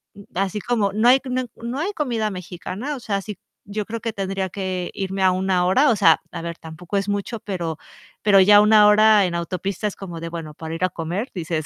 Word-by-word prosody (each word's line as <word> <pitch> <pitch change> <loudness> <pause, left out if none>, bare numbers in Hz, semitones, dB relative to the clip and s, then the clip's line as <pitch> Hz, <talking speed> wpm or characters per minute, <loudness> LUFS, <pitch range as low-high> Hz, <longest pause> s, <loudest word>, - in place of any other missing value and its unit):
mm, 200 - -12
así 195 +2 -1
como 215 -5 0
no 220 +3 +2
hay 260 - +7
c 260 - -7
no 255 0 -1 0.2
no 245 +4 -3
hay 380 +6 -1
comida 235 - -1
mexicana. 185 - -6
O - - -7
sea, 200 -4 -2
si 205 -2 -8 0.3
yo 205 0 -4
creo 230 0 -6
que 230 - -2
tendría 195 -1 -3
que 185 -2 -3
irme 195 0 -3
a 185 - +5
1 185 -1 +1
hora, 260 +11 +4
o - - +2
sea, 165 -6 +5
a 165 - -6
ver, 170 0 -6
tampoco 170 +4 -6
es 195 +1 -1
mucho, 205 +3 -3
pero 170 -6 -4 0.5
pero 200 -2 +6
ya 205 +2 +7
una 210 0 +6
hora 210 -1 +6
en 170 -1 -2
autopista 185 +4 -3
es 205 - -5
como 175 -4 -8
de: 165 0 -5
"Bueno, 165 -3 -7
para 160 +1 -6
ir 180 - -4
a 185 - +3
comer", 175 +10 -4
dices, 160 -3 -3
195 Hz, 235 wpm, -22 LUFS, 180-215 Hz, 0.5 s, hay